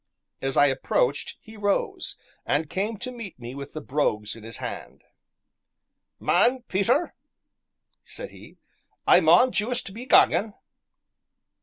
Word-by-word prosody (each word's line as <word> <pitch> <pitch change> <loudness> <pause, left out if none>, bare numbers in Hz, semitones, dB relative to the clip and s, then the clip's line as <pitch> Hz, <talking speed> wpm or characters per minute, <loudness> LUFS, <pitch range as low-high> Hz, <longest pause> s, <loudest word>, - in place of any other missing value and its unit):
As 135 0 -2
I - - +7
approached 135 0 0
he 220 - -14
rose, 205 -1 -1 0.3
and 150 +1 -1
came 210 +4 -2
to 255 +5 -5
meet 230 -7 -9
me 120 0 -8
with 140 +1 -8
the 155 - -5
brogues 110 -8 -1
in 115 - -12
his 115 +1 -7
hand. - - -7 1.2
"Man, 250 +1 +3
Peter," 240 - +1 0.9
said - - -8
he, - - -15 0.5
"I - - +7
maun 255 0 +5
juist 220 -2 -1
be 240 +5 -8
gangin'." 215 -4 +4
195 Hz, 130 wpm, -25 LUFS, -, 1.2 s, I